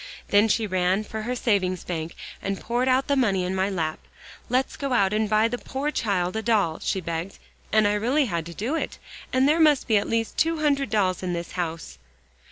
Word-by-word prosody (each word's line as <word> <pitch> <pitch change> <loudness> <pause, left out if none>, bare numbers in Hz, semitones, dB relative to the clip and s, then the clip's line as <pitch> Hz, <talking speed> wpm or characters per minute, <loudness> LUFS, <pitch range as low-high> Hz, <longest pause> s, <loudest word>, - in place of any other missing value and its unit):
Then 205 +2 +5
she 220 +1 +1
ran 185 +1 +1
for 220 +1 -6
her 245 +3 -2
savings 190 -7 0
bank, 165 -1 -4 0.3
and 195 0 -3
poured 240 +2 -1
out 260 +1 +3
the 280 - +1
money 200 -8 +2
in 180 +1 -2
my 190 +1 +1
lap. 160 -5 -2 0.5
'Let's 255 +2 0
go 275 -2 -2
out 200 -4 +3
and 215 0 +1
buy 215 +1 +4
the 245 +1 -4
poor 280 +3 -3
child 185 -8 -1
a 220 - -1
doll,' 210 -8 +1
she 190 - -1
begged, 170 +3 -4 0.3
and 215 -1 +4
I 205 - +2
really 250 +8 +2
had 170 -7 -3
to 170 - -8
do 235 +8 -2
it. 325 - -2 0.3
And 260 +1 +3
there 310 +3 +3
must 305 -4 +4
be 220 - +4
at 200 - -1
least 225 -1 -1
two 330 0 +2
hundred 280 -4 +1
dolls 190 -4 +1
in 180 -1 -2
this 170 0 -4
house." 165 - -4
210 Hz, 220 wpm, -25 LUFS, 185-250 Hz, 0.5 s, Then